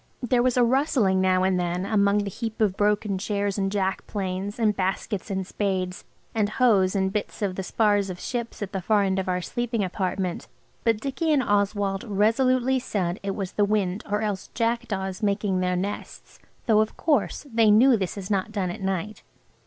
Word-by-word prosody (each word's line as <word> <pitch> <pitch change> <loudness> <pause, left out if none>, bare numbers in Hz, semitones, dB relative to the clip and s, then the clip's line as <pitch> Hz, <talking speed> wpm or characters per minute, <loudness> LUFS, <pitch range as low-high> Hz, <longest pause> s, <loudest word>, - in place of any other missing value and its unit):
There 245 0 +2
was 255 0 +1
a 245 - +5
rustling 235 -7 +2
now 185 0 +3
and 185 -1 +2
then 175 +1 -1
among 205 0 +2
the 200 - -4
heap 225 +2 -5
of 205 -4 +2
broken 205 -1 +1
chairs 205 0 -1
and 195 0 0
jack 195 -2 -1
planes 195 0 -3
and 215 -3 +2
baskets 195 +2 -2
and 190 -1 -2
spades 185 -2 -2 0.3
and 215 -2 +1
hoes 210 -5 +3
and 190 -1 0
bits 210 +1 -3
of 195 -2 0
the 190 - -4
spars 205 0 +1
of 180 -1 -6
ships 235 -3 -4
at 195 - -6
the 190 - -3
far 205 +2 +2
end 190 -1 0
of 190 - -3
our 180 0 0
sleeping 240 -1 -2
apartment, 185 -1 -2 0.4
but 225 -2 +2
Dicky 280 +6 -1
and 285 -4 +3
Oswald 200 -1 0
resolutely 255 +5 +2
said 190 -6 -2
it 195 -1 -3
was 195 -3 -4
the 205 - +1
wind 200 -1 0
or 210 +1 0
else 205 -3 -3
jackdaws 230 -5 -1
making 200 -2 0
their 180 0 0
nests, 195 +3 -5 0.3
though, 215 -3 +4
of 215 - -3
course, 300 -1 0
they 225 -1 +4
knew 240 +5 +6
this 195 -2 -3
is 195 0 -6
not 200 +2 0
done 195 -4 -1
at 210 - -8
night. 190 +2 -3
205 Hz, 195 wpm, -25 LUFS, 190-220 Hz, 0.4 s, knew